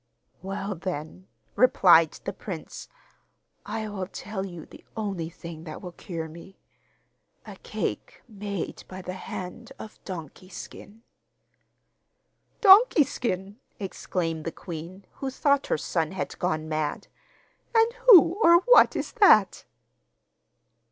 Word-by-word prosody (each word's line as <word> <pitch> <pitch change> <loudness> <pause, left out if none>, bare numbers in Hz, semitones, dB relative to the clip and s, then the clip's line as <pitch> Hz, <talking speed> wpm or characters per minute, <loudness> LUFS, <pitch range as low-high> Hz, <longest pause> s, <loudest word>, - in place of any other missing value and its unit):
'Well, 195 +1 -4
then,' 155 - -6 0.3
replied 175 -9 +5
the - - -3
prince, - - -8 0.8
'I 215 0 -4
will 190 -3 -5
tell 195 +1 -6
you 175 -4 -10
the - - -16
only 195 -7 -3
thing 170 -2 -10
that 155 - -8
will 180 - -8
cure 165 -2 -6
me 170 +4 -13 0.9
a - - -10
cake - - -5
made 200 -4 -6
by 185 0 -9
the 180 - -5
hand 185 +4 -8
of 215 - -12
"Donkey 180 0 -9
Skin."' 215 +3 -11 1.6
'Donkey 395 -4 +7
Skin?' 205 -6 -4 0.2
exclaimed 170 -4 -3
the 165 - -4
queen, 175 +4 -9
who 270 - -3
thought 280 +1 +1
her - - 0
son 160 +2 -2
had 190 - -5
gone 155 -3 -1
mad; 155 -1 -3 0.7
'and 455 +1 +4
who 360 -4 +8
or 340 -1 +7
what - - +6
is - - -3
that? 440 -5 +4
190 Hz, 125 wpm, -26 LUFS, 165-225 Hz, 1.6 s, who